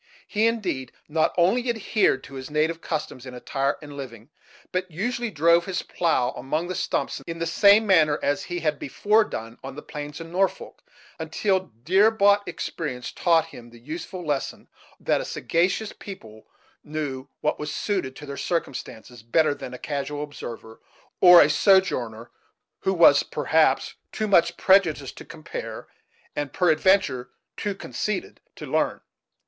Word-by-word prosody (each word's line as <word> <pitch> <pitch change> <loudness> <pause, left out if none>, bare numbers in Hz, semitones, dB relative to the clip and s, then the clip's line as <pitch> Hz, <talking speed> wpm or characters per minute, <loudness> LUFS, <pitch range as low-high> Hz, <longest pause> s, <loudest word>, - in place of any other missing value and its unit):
He, 220 +1 +2
indeed, 185 - -2 0.2
not 155 +1 +1
only 230 +9 +3
adhered 215 - +1
to - - -12
his 130 0 -7
native 160 +2 0
customs 150 -5 -4
in 125 - -8
attire 135 +3 -1
and 145 -1 -10
living, 120 -3 -9 0.4
but 185 0 -2
usually 235 +8 -2
drove 170 0 +3
his 190 - -2
plough 145 -8 0
among 155 +6 -3
the - - -2
stumps 185 - -2
in 165 0 -5
the 165 - -2
same 200 +6 +5
manner 160 -7 +4
as 145 - 0
he 175 0 -4
had 155 -2 0
before 210 - +2
done 115 - -7
on 135 0 -7
the 150 - -8
plains 150 +1 -7
of 165 - -7
Norfolk, 185 +4 -2 0.4
until 190 -3 -1
dear 195 - +5
bought 205 -2 +3
experience 145 -6 -5
taught 165 -2 +3
him 120 -1 -11
the 120 - -15
useful 165 +7 -7
lesson 145 -3 -3 0.3
that - - +1
a - - -4
sagacious 185 +6 -1
people 110 - -11 0.4
knew 145 -3 -4
what - - 0
was 150 0 -4
suited 185 -11 -2
to 150 - -9
their 140 -1 -7
circumstances 125 -7 -4
better 145 +7 +2
than 130 - -8
a 125 - -7
casual 145 +1 -4
observer, 115 -6 -9 0.4
or 180 -1 +9
a - - +3
sojourner 145 - +2 0.5
who 190 - 0
was, 145 -4 +7
perhaps, 155 -2 +1 0.2
too 215 - -2
much 170 -4 +3
prejudiced 165 -8 +3
to - - -11
compare 155 -1 -7 0.5
and, 145 -1 -3
peradventure, 160 -7 +2 0.3
too 205 -2 -3
conceited 210 +1 -4
to - - -8
learn. - - 0
160 Hz, 155 wpm, -25 LUFS, 135-190 Hz, 0.5 s, or